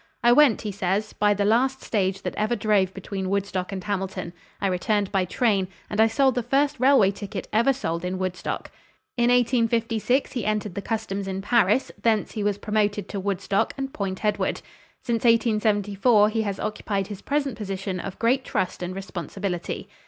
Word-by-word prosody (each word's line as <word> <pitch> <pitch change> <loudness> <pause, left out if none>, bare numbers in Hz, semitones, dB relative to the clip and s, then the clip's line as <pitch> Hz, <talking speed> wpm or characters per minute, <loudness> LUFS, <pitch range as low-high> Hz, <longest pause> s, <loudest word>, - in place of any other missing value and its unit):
"I 240 - +6
went," 265 -2 +5
he 210 - -3
says, 195 +2 -1
"by 205 0 +2
the 200 0 0
last 260 +5 +2
stage 195 -3 -1
that - - -3
ever 215 +3 0
drove 205 -4 +2
between 195 0 -5
Woodstock 195 -2 -2
and 190 -2 -5
Hamilton; 190 -3 -3 0.3
I - - -2
returned 195 +2 0
by 190 -2 +1
train, 200 -1 +1 0.2
and 210 +1 +2
I 225 - +6
sold 265 +4 +3
the 245 - 0
first 275 +4 +1
railway 255 -7 +5
ticket 200 -1 -6
ever 235 +5 +4
sold 170 -11 -3
in 180 +1 -2
Woodstock." 185 -1 -4 0.4
In 240 0 +2
1856 235 0 +2
he 245 -5 -3
entered 210 -2 -1
the 200 - -4
customs 200 -3 -3
in 190 0 -4
Paris, 230 +2 +2
thence 220 -2 +1
he 215 - -3
was 205 -1 0
promoted 205 -1 0
to 200 - -4
Woodstock 195 0 -1
and 270 0 -4
Point 195 0 -3
Edward. 210 - 0 0.4
Since 235 +1 -1
1874 215 -2 +3
he 220 +1 0
has 200 -3 -3
occupied 205 -2 -2
his 200 -1 -8
present 280 -3 -1
position 195 -3 -4
of 195 +1 -6
great 255 +3 +2
trust 185 - -2
and 180 +1 -4
responsibility. 190 -1 -4
205 Hz, 180 wpm, -25 LUFS, 195-230 Hz, 0.4 s, I